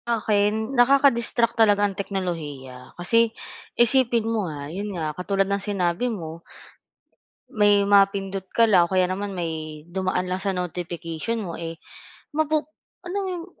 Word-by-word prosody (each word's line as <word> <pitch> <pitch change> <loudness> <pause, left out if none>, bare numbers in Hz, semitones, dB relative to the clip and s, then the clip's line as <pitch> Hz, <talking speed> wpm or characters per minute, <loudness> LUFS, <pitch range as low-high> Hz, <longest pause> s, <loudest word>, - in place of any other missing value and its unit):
Akin 215 +1 +1
nakaka-distract 245 -3 +3
talaga 205 -2 +5
ang 200 - -1
teknolohiya, 155 -10 -5
kasi 230 +6 +3 0.5
isipin 240 -1 +3
mo 220 -5 -1
nga, 145 -2 -6
yun 205 +3 -4
nga 155 -2 -2
katulad 195 +4 0
ng 200 +1 -1
sinabi 195 +3 -1
mo. 165 -6 -6 1.1
May 205 -1 +4
mapindot 195 -1 +3
ka 230 -1 +4
lang 180 -4 +6
o 170 - -10
kaya 185 -1 +2
naman 200 +2 -3
may 160 -3 -5
dumaan 185 0 -1
lang 185 - -1
sa 195 -1 0
notification 175 +3 -4
mo, 175 -5 -5
eh, 165 0 -7 0.5
mapu 310 0 +1 0.4
alam 360 +3 -4
mo 390 -1 -2
yung 340 -1 -6
195 Hz, 145 wpm, -24 LUFS, 175-225 Hz, 1.1 s, lang